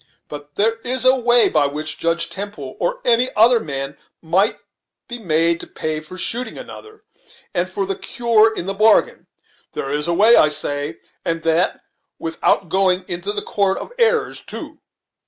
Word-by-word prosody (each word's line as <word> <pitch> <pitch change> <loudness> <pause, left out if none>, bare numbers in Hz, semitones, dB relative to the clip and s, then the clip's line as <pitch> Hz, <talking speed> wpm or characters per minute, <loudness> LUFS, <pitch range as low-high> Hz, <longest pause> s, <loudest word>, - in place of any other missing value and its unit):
But 145 0 -10
there 225 +2 +1
is 255 +1 +1
a 260 +1 +6
way 240 -1 +4
by 150 -2 +2
which 155 +2 -6
Judge 165 0 0
Temple, 170 -8 -6
or 175 - -2
any 245 +1 +3
other 230 +2 +5
man, 140 -5 -5 0.2
might 180 +6 +1 0.5
be 240 -1 -6
made 165 -3 +2
to - - -7
pay 155 -1 -3
for 155 +4 -10
shooting 240 +6 0
another, 430 0 -11 0.5
and 180 0 -1
for 195 +1 -3
the 195 0 -3
cure 225 -2 +2
in 200 - -5
the 195 - -2
bargain. 215 +2 +2 0.5
There 135 - -4
is 150 +2 -2
a 170 - +1
way, 220 +6 +6
I 155 - +5
say, 145 +1 -1 0.3
and 165 0 -3
that 165 +2 +1 0.4
without 165 +3 0
going 185 +1 +2
into 175 +3 -3
the 205 0 -3
'court 195 -2 0
of - - -8
errors,' 465 -1 +1
too." - - -9
185 Hz, 175 wpm, -19 LUFS, 160-225 Hz, 0.5 s, a